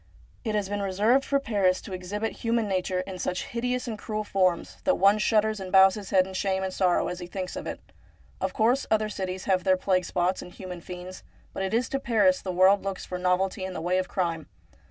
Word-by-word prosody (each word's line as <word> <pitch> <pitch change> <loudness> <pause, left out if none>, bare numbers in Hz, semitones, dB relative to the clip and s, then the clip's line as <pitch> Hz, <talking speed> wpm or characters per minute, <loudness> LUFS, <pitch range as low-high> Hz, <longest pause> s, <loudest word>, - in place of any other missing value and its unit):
It 220 -3 -1
has 205 -2 0
been 205 +1 -3
reserved 210 +7 +2
for 280 0 +1
Paris 200 -8 +1
to 195 - -8
exhibit 205 +4 -4
human 230 -1 0
nature 185 -1 -1
in 185 0 -7
such 180 - -2
hideous 250 +2 -2
and 220 -3 -4
cruel 215 0 -3
forms, 185 -4 0
that 280 - +3
one 200 +2 +4
shudders 215 0 +2
and 185 -1 -6
bows 190 0 +7
his 205 -2 -7
head 185 -2 +4
in 190 - -9
shame 190 0 0
and 190 -1 -3
sorrow 180 -2 +2
as 180 - -4
he 175 - -7
thinks 185 0 -5
of - - -6
it. - - -5 0.6
Of - - 0
course, 240 +5 +2
other 215 -1 +2
cities 190 -2 -4
have 185 -2 +2
their 185 +1 +3
plague 185 -1 +1
spots 180 +1 0
and 180 - -10
human 180 -2 -8
fiends, 180 +1 -8 0.3
but - - -4
it 190 - -1
is 230 +2 +1
to 275 - -1
Paris 270 +3 +3
the 185 - -3
world 185 +2 +5
looks 195 -1 -4
for 180 - -5
novelty 185 +1 0
in 190 0 -4
the - - -4
way 180 +2 +1
of 185 - -2
crime. 165 -4 -2
190 Hz, 235 wpm, -27 LUFS, 185-215 Hz, 0.6 s, bows